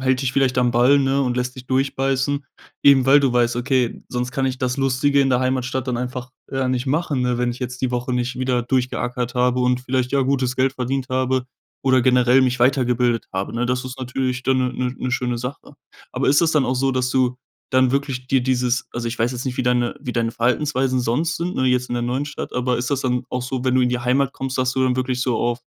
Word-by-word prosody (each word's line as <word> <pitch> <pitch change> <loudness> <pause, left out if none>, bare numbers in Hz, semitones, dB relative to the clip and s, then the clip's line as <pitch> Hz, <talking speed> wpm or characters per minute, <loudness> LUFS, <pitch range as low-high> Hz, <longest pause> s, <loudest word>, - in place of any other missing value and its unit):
hält 130 0 +1
dich 125 -1 -1
vielleicht 130 -2 +1
am 125 -1 +2
Ball, 125 +4 +5
ne, 135 0 +1
und 125 -1 -1
lässt 125 0 -2
dich 130 -1 -11
durchbeißen. 135 +1 0 0.4
Eben, 135 -2 +6
weil 140 +2 +7
du 135 -3 +1
weißt: 120 -1 +2
„Okay, 125 -1 0
sonst 125 0 -3
kann 135 0 0
ich 130 -1 -2
das 125 -1 -1
Lustige 135 +1 +2
in 135 - +2
der 125 - +3
Heimatstadt 130 0 -1
dann 125 -2 -1
einfach, 125 +1 -5 0.2
äh, 135 -1 -1
nicht 125 +1 -1
machen, 145 -1 0
ne, 125 -1 0
wenn 125 0 +1
ich 125 - -11
jetzt 125 0 -5
die 125 - 0
Woche 125 +1 -2
nicht 125 +1 -1
wieder 125 -1 0
durchgeackert 125 0 -2
habe 125 0 +2
und 125 0 +1
vielleicht 130 -1 -1
ja 140 -1 +2
gutes 130 -1 0
Geld 130 0 +2
verdient 130 0 -2
habe 130 0 0 0.4
oder 130 -1 +4
generell 125 +1 +4
mich 130 -1 +1
weitergebildet 125 -2 +2
habe, 95 +2 -3
ne?" 120 +1 0
Das 125 +1 -1
ist 130 +1 -7
natürlich 130 0 -2
dann 130 +1 +2
'ne 125 0 0
'ne 125 0 -2
'ne 130 - -3
schöne 125 -2 -1
Sache. 125 +4 -7 0.4
Aber - - -2
ist 145 +1 +5
das 165 -2 +3
dann 150 -4 +2
auch 130 - 0
so, 135 +1 +1
dass 125 -1 0
du 125 -1 +1 0.3
dann 130 -1 +3
wirklich 135 -2 -2
dir 135 0 +3
dieses 125 -1 0
also 120 -1 -3
ich 115 - -6
weiß 120 +3 +1
jetzt 125 +2 -5
nicht, 125 - -3
wie - - 0
deine 125 -1 +1
wie 125 - -5
deine 115 -1 0
Verhaltensweisen 130 +2 0
sonst 145 +8 0
sind, 175 +2 -3
ne, 130 - +1
jetzt 125 0 +1
in - - -3
der 120 - -1
neuen 125 +4 -1
Stadt, 150 - -6
aber 125 0 0
ist 125 - -3
das 140 -2 0
dann 125 -1 -1
auch 125 - -2
so, 125 0 -4
wenn 130 0 +2
du 130 - +4
in 125 - +3
die 125 0 -1
Heimat 130 +2 +1
kommst, 130 -1 -4
dass 130 0 +1
du 130 - 0
dann 125 - +1
wirklich 125 -1 -1
so 125 -3 0
auf 120 0 -1
125 Hz, 250 wpm, -21 LUFS, 125-130 Hz, 0.4 s, weil